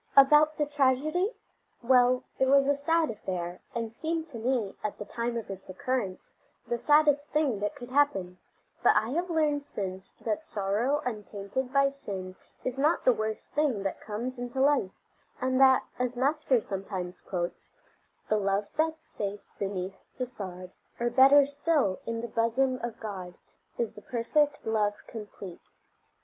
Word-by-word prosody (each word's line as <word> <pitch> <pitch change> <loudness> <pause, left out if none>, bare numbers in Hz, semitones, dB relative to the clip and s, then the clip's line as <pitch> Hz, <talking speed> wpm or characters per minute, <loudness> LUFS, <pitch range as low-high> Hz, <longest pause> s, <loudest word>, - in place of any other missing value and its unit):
About 300 +3 +7
the 295 - +2
tragedy? 295 - +1 0.5
Well, 250 0 +4 0.2
it 265 - +4
was 275 0 +5
a 285 - +4
sad 320 +2 +1
affair, 180 -4 -5
and 230 -1 -3
seemed 320 +5 -2
to 240 -6 -7
me, 230 -4 0
at 210 - -3
the 210 - -6
time 235 +2 -2
of 220 -3 -5
its 190 0 -9
occurrence, 195 -1 -3 0.3
the 240 - -2
saddest 295 0 +4
thing 290 -8 +1
that 210 +8 -2
could 250 -3 -10
happen; 195 -11 +1 0.4
but - - +5
I 220 - +2
have 345 +5 -1
learned 305 -3 +2
since 195 -8 -6
that 225 +7 -1
sorrow 225 +4 0
untainted 215 +2 -4
by 275 0 +4
sin 190 -9 -7 0.3
is 255 +1 -3
not 305 +4 +2
the 255 - +7
worst 220 -1 -4
thing 275 -9 +1
that 195 - -3
comes 240 +4 -4
into 245 +2 -4
life, 275 -7 +3 0.5
and 260 0 +1
that 265 -1 +7 0.2
as 250 0 -1
Master 270 -2 +2
sometimes 190 -3 -5
quotes: 175 -2 -4 0.6
"The 215 - +2
love 200 0 0
that's 320 0 0
safe 205 0 -4 0.2
beneath 195 -1 -3 0.2
the 255 - -1
sod, 185 -6 -8 0.3
Or 240 0 0
better 275 +3 +7
still, 285 - +1
in 230 0 -2
the 235 - -4
bosom 235 +3 +1
of 235 -1 -5
God, 190 -5 -6 0.4
Is 235 -2 -1
the 210 - -12
perfect 290 +6 0
love 210 -2 +1
complete." 205 -5 -9
245 Hz, 160 wpm, -29 LUFS, 205-280 Hz, 0.6 s, About